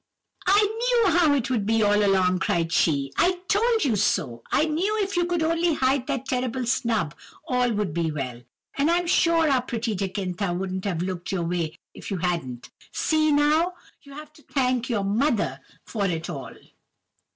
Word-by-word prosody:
"'I 405 +3 +5
knew 455 0 +2
how 320 -5 +4
it 265 -1 -1
would 230 -5 +1
be 225 0 +2
all 205 0 +3
along!' 185 -2 +2
cried 165 -1 0
she; 140 -5 +1
'I 360 +1 +2
told 445 0 +2
you 240 -6 +2
so! 135 - 0
I 310 - +3
knew 355 +8 0
if 395 0 -4
you 350 0 +2
could 345 -2 -1
only 330 0 +1
hide 260 -1 +1
that 265 - -2
terrible 255 -1 -2
snub 225 - 0 0.3
all 250 -1 +1
would 205 -6 -2
be 170 -1 0
well; 130 -5 -5 0.4
and 285 +3 +3
I'm 350 +1 +2
sure 335 -2 +3
our 265 -3 +3
pretty 235 -2 -3
Jacintha 190 -1 -2
wouldn't 190 0 -4
have 175 -4 -1
looked 180 -1 -4
your 185 -3 -1
way 165 -2 -2 0.2
if - - -9
you 195 - -2
hadn't! 165 -9 -3 0.2
See, 310 -1 +1
now! 305 +5 +3 0.3
you 280 -2 -14
have 305 0 -10
to 305 - -19
thank 255 -4 -1
your 220 -5 0
mother 220 +4 0 0.3
for 205 -4 -2
it 170 -1 -3
all! 135 -7 -7
235 Hz, 185 wpm, -25 LUFS, -, 0.4 s, I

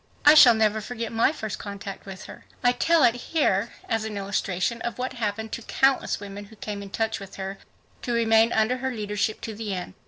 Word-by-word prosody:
I 295 - +10
shall 260 -7 +9
never 220 0 +2
forget 230 0 -5
my 230 +4 +3
first 220 -9 -5
contact 200 -1 -7
with 190 -1 -8
her. - - -12 0.2
I 245 - +5
tell 325 +5 +3
it 240 -2 +6
here 240 -5 0 0.2
as 225 -1 0
an 215 -2 -5
illustration 195 +2 -1
of 235 -2 -4
what 255 +1 -3
happened 220 -1 -3
to - - -4
countless 270 +3 +1
women 205 0 -8
who 220 +2 -16
came 205 -1 -6
in 200 - -8
touch 225 +2 -1
with 195 -1 -10
her 195 0 -6 0.4
to 245 - -3
remain 225 -1 +4
under 220 +4 +2
her 265 +1 -2
leadership 210 -3 -2
to 225 - -5
the 210 -2 -4
end. 180 +1 -6
220 Hz, 215 wpm, -25 LUFS, 200-240 Hz, 0.4 s, I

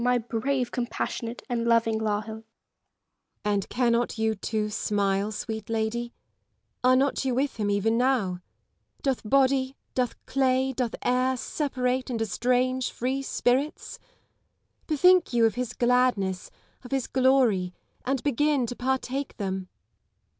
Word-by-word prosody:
my 250 0 +3
brave, 245 +2 -1
com 245 -1 -2
passionate, 235 -1 -4
and 240 -3 -1
loving 230 -1 +3
Lisle! 210 -1 0
Elizabeth 220 - -6
Gaunt. 225 - -45
And 205 -2 0
cannot 240 -1 +1
you, 220 0 +1
too, 210 +1 -2
smile, 200 0 0
sweet 220 0 -5
lady 225 +2 -1 0.7
1 255 - +5
Are - - +6
not 275 +2 +1
you 260 -2 0
with 270 0 -1
him 210 -2 -1
even 220 +3 +1
now 250 -7 +2
1 180 0 -7 0.6
Doth 270 -4 0
body, 270 0 +2 0.2
doth 250 -2 0
clay, 265 0 +1
doth 240 -2 -2
air, 255 +1 +2
separate 255 -2 -1
and 235 -3 -2
estrange 250 +4 +1
free 260 +3 -2
spirits 270 +2 -1 0.9
1 310 - 0
Bethink 360 -1 +5
you 235 -1 +4
of 225 - +2
his 245 +1 -3
gladness, 240 -7 +1 0.3
of 245 - -10
his 270 -2 0
glory; 255 -9 +3 0.3
and 265 -1 -1
begin 290 -1 +2
to 245 - -5
partake 265 +2 -2
them. 190 -2 -3
245 Hz, 145 wpm, -26 LUFS, 220-260 Hz, 0.9 s, Are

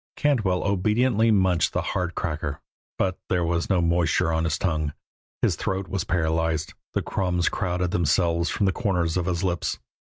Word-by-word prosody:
Cantwell 110 -12 +1
obediently 110 +4 +2
munched 95 -6 +3
the - - 0
hard 90 -2 -2
cracker, 75 -4 -3 0.4
but 95 -1 0
there 90 -2 +1
was 85 0 -1
no 95 -3 +3
moisture 85 0 +2
on 80 0 +1
his 80 -1 0
tongue; 80 -5 -1 0.5
his - - +3
throat 95 0 -2
was 95 -3 -2
paralyzed; 80 -2 0 0.2
the - - +1
crumbs 90 -2 0
crowded 90 -2 -1
themselves 85 0 +2
from 105 - 0
the 95 - +3
corners 90 -6 0
of 90 -1 0
his 90 0 -1
lips. 90 -3 -1
90 Hz, 165 wpm, -25 LUFS, 85-95 Hz, 0.5 s, munched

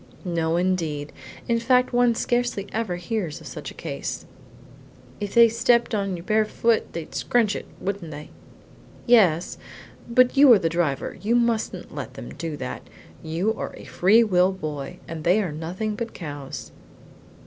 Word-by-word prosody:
"No 165 -2 0
indeed, 165 -5 -1 0.4
in 235 -1 +2
fact 250 +2 +2
one 245 -1 +4
scarcely 240 -4 0
ever 220 -5 -1
hears 175 -3 -3
of - - -14
such - - -7
a - - -12
case." 70 - -5 0.9
"If 205 +1 -5
they 235 0 +9
stepped 235 +1 +2
on 195 -3 -1
your 170 - -9
bare 215 +3 +2
foot 230 +1 +1
they'd 165 -2 -6
scrunch 225 -4 +1
it, - - -6
wouldn't 195 -3 -4
they?" 150 0 -9 0.7
"Yes, 190 -9 +4 0.5
but 250 +2 +4
you 275 -1 +8
are - - +7
the 165 - 0
driver; 160 -5 -1
you 225 +4 +1
mustn't 235 -2 0
let - - -6
them - - -8
do 160 -3 -5
that; - - -5 0.4
you 170 +7 -1
are - - -6
a - - -11
free 210 +6 +4
will 185 -3 +3
boy, 150 -7 -6
and 160 -1 -6
they 180 +6 +4
are 190 -7 -1
nothing 175 +8 -4
but 235 +1 -5
cows." 145 -6 -7
190 Hz, 165 wpm, -24 LUFS, 165-230 Hz, 0.9 s, they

